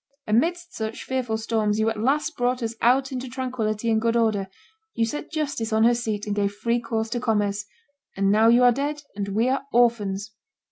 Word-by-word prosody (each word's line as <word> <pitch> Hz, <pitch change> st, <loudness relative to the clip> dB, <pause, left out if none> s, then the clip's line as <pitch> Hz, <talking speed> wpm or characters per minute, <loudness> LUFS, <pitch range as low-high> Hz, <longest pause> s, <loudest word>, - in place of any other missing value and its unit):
Amidst 345 Hz, +11 st, 0 dB
such 220 Hz, 0 st, -4 dB
fearful 250 Hz, -4 st, -2 dB
storms 220 Hz, -2 st, 0 dB
you 220 Hz, -, +2 dB
at 225 Hz, -1 st, -1 dB
last 290 Hz, +7 st, 0 dB
brought 245 Hz, 0 st, 0 dB
us 225 Hz, 0 st, -2 dB
out 260 Hz, +3 st, +3 dB
into 255 Hz, -1 st, -4 dB
tranquillity 235 Hz, -4 st, -2 dB
and 220 Hz, 0 st, +2 dB
good 230 Hz, 0 st, +1 dB
order; 215 Hz, -4 st, +1 dB, 0.5 s
you 230 Hz, -, +2 dB
set 295 Hz, +6 st, -5 dB
justice 285 Hz, -8 st, -2 dB
on 220 Hz, 0 st, +3 dB
her 240 Hz, +1 st, +5 dB
seat 220 Hz, -3 st, -2 dB
and 205 Hz, -1 st, -2 dB
gave 200 Hz, -1 st, 0 dB
free 235 Hz, +3 st, 0 dB
course 225 Hz, -1 st, -2 dB
to 240 Hz, -, -1 dB
commerce. 210 Hz, -3 st, 0 dB, 0.5 s
And 195 Hz, 0 st, +2 dB
now 220 Hz, +2 st, +5 dB
you 240 Hz, +2 st, +6 dB
are 245 Hz, -, +7 dB
dead, 290 Hz, +4 st, -2 dB
and 200 Hz, -1 st, -3 dB
we 215 Hz, +5 st, +1 dB
are 265 Hz, +1 st, +1 dB
orphans!" 215 Hz, -4 st, +1 dB
230 Hz, 200 wpm, -24 LUFS, 215-250 Hz, 0.5 s, are